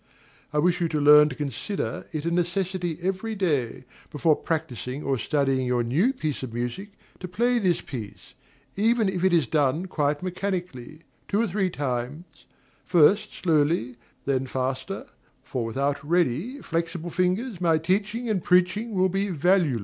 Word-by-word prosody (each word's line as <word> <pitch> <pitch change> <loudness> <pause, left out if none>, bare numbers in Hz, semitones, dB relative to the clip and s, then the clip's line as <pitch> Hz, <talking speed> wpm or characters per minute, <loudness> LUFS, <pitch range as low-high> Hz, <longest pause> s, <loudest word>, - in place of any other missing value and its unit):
I 150 - -2
wish 175 +3 +2
you 170 - +2
to 155 -2 -1
learn 150 +1 +7
to 130 - -7
consider 145 - -4
it 155 -1 -4
a 170 - 0
necessity 175 -1 -1
every 195 +4 -2
day, 145 - -1 0.3
before 155 +1 +2
practising 145 -4 -4
or 135 -2 0
studying 135 -3 0
your 125 -1 +1
new 155 - +2
piece 155 - -3
of 120 -3 -6
music, 125 - -4 0.3
to 185 - -6
play 240 +7 +1
this 185 -5 +1
piece, 110 -7 -8 0.4
even 225 +1 +2
if 185 -2 -2
it 190 - +4
is 165 -5 +3
done 150 +5 +1
quite 150 -3 -1
mechanically, 180 -6 -4 0.2
two 205 - 0
or 230 - +3
three 195 -1 0
times, 145 +3 -5 0.4
first 195 +5 +3
slowly, 150 -7 +1 0.3
then 135 -1 0
faster; 130 +9 -3 0.4
for 130 -3 -3
without 140 +5 -1
ready, 175 - 0
flexible 170 +1 -3
fingers, 185 +4 -1
my 165 -2 +3
teaching 205 +8 -1
and 205 -5 0
preaching 185 +5 +2
will 185 0 +3
be 195 +2 -1
valueless. 175 -5 +2
165 Hz, 155 wpm, -25 LUFS, 140-190 Hz, 0.4 s, learn